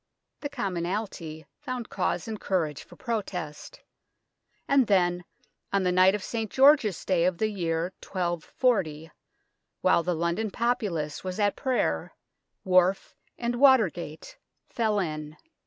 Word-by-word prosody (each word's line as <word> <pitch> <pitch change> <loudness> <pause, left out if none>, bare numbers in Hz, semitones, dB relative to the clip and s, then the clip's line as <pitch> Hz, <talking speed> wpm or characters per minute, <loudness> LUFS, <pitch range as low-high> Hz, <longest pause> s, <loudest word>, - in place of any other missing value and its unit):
The 285 - -4
commonalty 180 - -4
found 250 -2 -5
cause 180 -1 -1
and 220 -2 -5
courage 160 -7 -1
for - - -16
protest; 190 - -5 0.9
and 275 -4 +4
then, 175 -3 +2 0.5
on 200 -1 +2
the 180 - +2
night 185 +2 +5
of 205 - -5
St. 225 -2 -3
George's 265 - +4
Day 180 -3 +2
of 180 -1 +1
the 215 +3 +1
year 170 -2 -2
1240, 175 - -1 0.7
while - - +4
the 175 +1 -1
London 170 +7 -1
populace 195 -10 -1
was 185 +2 -4
at 205 -1 +2
prayer, 80 - -1 0.5
wharf 185 +1 +2 0.2
and 240 0 -2
water 260 - +6
gate 170 - -9 0.3
fell 220 -3 0
in. 155 -4 -3
185 Hz, 130 wpm, -27 LUFS, 170-225 Hz, 0.9 s, water